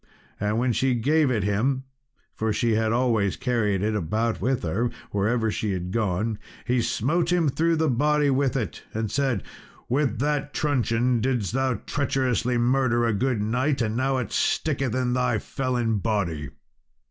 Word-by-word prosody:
And 105 Hz, +2 st, 0 dB
when 120 Hz, +1 st, +1 dB
she 130 Hz, +2 st, +1 dB
gave 145 Hz, +5 st, +2 dB
it 110 Hz, -6 st, 0 dB
him 125 Hz, +7 st, 0 dB, 0.5 s
for 110 Hz, 0 st, -1 dB
she 115 Hz, +2 st, +1 dB
had 110 Hz, 0 st, +1 dB
always 115 Hz, -5 st, +1 dB
carried 115 Hz, -7 st, 0 dB
it 110 Hz, +1 st, +1 dB
about 110 Hz, +4 st, -1 dB
with 130 Hz, +4 st, 0 dB
her, 105 Hz, +9 st, 0 dB, 0.2 s
wherever 110 Hz, +2 st, +1 dB
she 105 Hz, -1 st, -2 dB
had 90 Hz, 0 st, -4 dB
gone 105 Hz, 0 st, -1 dB, 0.3 s
he 125 Hz, +1 st, +1 dB
smote 165 Hz, +10 st, 0 dB
him 170 Hz, -4 st, +3 dB
through 165 Hz, +4 st, +1 dB
the 160 Hz, 0 st, +1 dB
body 150 Hz, +2 st, +2 dB
with 135 Hz, 0 st, +1 dB
it, 115 Hz, -, -4 dB
and 110 Hz, -2 st, -2 dB
said, 135 Hz, -7 st, 0 dB, 0.4 s
"With 130 Hz, -2 st, +1 dB
that 145 Hz, +2 st, -1 dB
truncheon 125 Hz, -4 st, +1 dB
didst 120 Hz, -5 st, 0 dB
thou 130 Hz, -1 st, +1 dB
treacherously 130 Hz, -4 st, 0 dB
murder 120 Hz, 0 st, +2 dB
a 115 Hz, -, +1 dB
good 120 Hz, 0 st, 0 dB
knight, 130 Hz, +6 st, 0 dB
and 110 Hz, -2 st, 0 dB
now 130 Hz, +2 st, +1 dB
it 125 Hz, -, -3 dB
sticketh 135 Hz, -6 st, 0 dB
in 125 Hz, -1 st, 0 dB
thy 125 Hz, -2 st, +1 dB
felon 120 Hz, -2 st, -1 dB
body." 90 Hz, -, -1 dB
120 Hz, 165 wpm, -25 LUFS, 110-135 Hz, 0.5 s, him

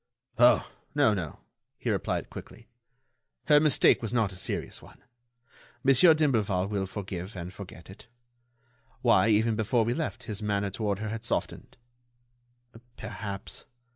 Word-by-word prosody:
"Oh! 120 Hz, +1 st, +5 dB, 0.3 s
no, 140 Hz, -7 st, +4 dB
no," 90 Hz, -7 st, -5 dB, 0.4 s
he -, -, -2 dB
replied -, -, -2 dB
quickly. 115 Hz, -, -11 dB, 0.8 s
"Her 150 Hz, -1 st, +6 dB
mistake 150 Hz, -3 st, +4 dB
was 115 Hz, -, -4 dB
not 115 Hz, -5 st, +1 dB
a -, -, -9 dB
serious -, -, -3 dB
one. -, -, -17 dB, 0.8 s
Monsieur 140 Hz, +5 st, +6 dB
d'Imblevalle 110 Hz, -11 st, +1 dB
will 100 Hz, -2 st, -2 dB
forgive 95 Hz, 0 st, -6 dB
and 90 Hz, +1 st, -6 dB
forget 90 Hz, -3 st, -11 dB
it. 95 Hz, -, -14 dB, 1.0 s
Why, 115 Hz, -4 st, +5 dB
even 110 Hz, +1 st, +3 dB
before 110 Hz, +1 st, +1 dB
we 120 Hz, -, 0 dB
left, 155 Hz, +3 st, -4 dB
his 105 Hz, -3 st, -5 dB
manner 100 Hz, -1 st, -1 dB
toward 100 Hz, -1 st, -2 dB
her 110 Hz, +1 st, -4 dB
had 110 Hz, +1 st, -5 dB
softened." -, -, -3 dB, 1.2 s
"Perhaps 105 Hz, -3 st, -6 dB
110 Hz, 140 wpm, -28 LUFS, 100-120 Hz, 1.2 s, Her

